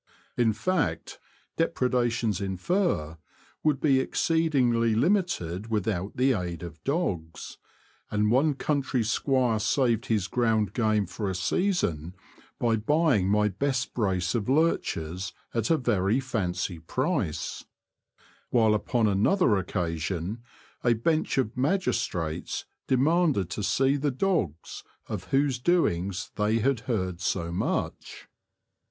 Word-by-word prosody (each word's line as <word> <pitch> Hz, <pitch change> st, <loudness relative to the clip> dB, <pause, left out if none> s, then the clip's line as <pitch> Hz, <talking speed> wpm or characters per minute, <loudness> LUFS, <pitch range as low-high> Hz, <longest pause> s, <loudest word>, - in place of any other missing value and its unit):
In 115 Hz, -2 st, +3 dB
fact, 155 Hz, -, -2 dB, 0.4 s
depredations 120 Hz, -, 0 dB
in 95 Hz, -1 st, -3 dB
fur 90 Hz, -, 0 dB, 0.4 s
would 150 Hz, -4 st, +2 dB
be 140 Hz, -3 st, +3 dB
exceedingly 130 Hz, -7 st, +2 dB
limited 115 Hz, -, 0 dB
without 105 Hz, -3 st, -2 dB
the 130 Hz, +1 st, +3 dB
aid 90 Hz, -5 st, -4 dB
of 80 Hz, -2 st, -9 dB
dogs; 95 Hz, -, -3 dB, 0.5 s
and 105 Hz, 0 st, +1 dB
one 140 Hz, +4 st, +3 dB
country 135 Hz, -4 st, 0 dB
squire 120 Hz, 0 st, +1 dB
saved 120 Hz, +1 st, +1 dB
his 105 Hz, -5 st, +1 dB
ground 110 Hz, -4 st, +1 dB
game 110 Hz, -4 st, +1 dB
for 95 Hz, +3 st, -4 dB
a 95 Hz, -, -3 dB
season 90 Hz, -, 0 dB, 0.4 s
by 115 Hz, -2 st, +1 dB
buying 130 Hz, -, +2 dB
my 105 Hz, +1 st, +3 dB
best 130 Hz, +5 st, -1 dB
brace 95 Hz, -6 st, 0 dB
of 115 Hz, -1 st, -1 dB
lurch 160 Hz, +5 st, +2 dB
ers 85 Hz, +4 st, -5 dB, 0.2 s
at 115 Hz, -2 st, 0 dB
a 165 Hz, -, +4 dB
very 110 Hz, -3 st, +1 dB
fancy 90 Hz, -9 st, -2 dB
price; 100 Hz, -, -2 dB, 0.9 s
while 110 Hz, -3 st, +4 dB
upon 110 Hz, +2 st, +1 dB
another 105 Hz, -, +3 dB
occasion 90 Hz, +2 st, -2 dB, 0.4 s
a 120 Hz, -, +4 dB
bench 155 Hz, +9 st, 0 dB
of 125 Hz, -5 st, 0 dB
magistrates 120 Hz, -, -1 dB, 0.2 s
demanded 140 Hz, -, +2 dB
to -, -, -3 dB
see 135 Hz, +7 st, +2 dB
the 145 Hz, +1 st, 0 dB
dogs 130 Hz, -, -2 dB, 0.2 s
of -, -, -5 dB
whose 135 Hz, -2 st, +1 dB
doings 95 Hz, -, 0 dB
they 105 Hz, +1 st, +2 dB
had 130 Hz, +2 st, +1 dB
heard 95 Hz, -6 st, -1 dB
so 85 Hz, -2 st, -1 dB
much. 85 Hz, -, -3 dB
115 Hz, 120 wpm, -27 LUFS, 95-135 Hz, 0.9 s, a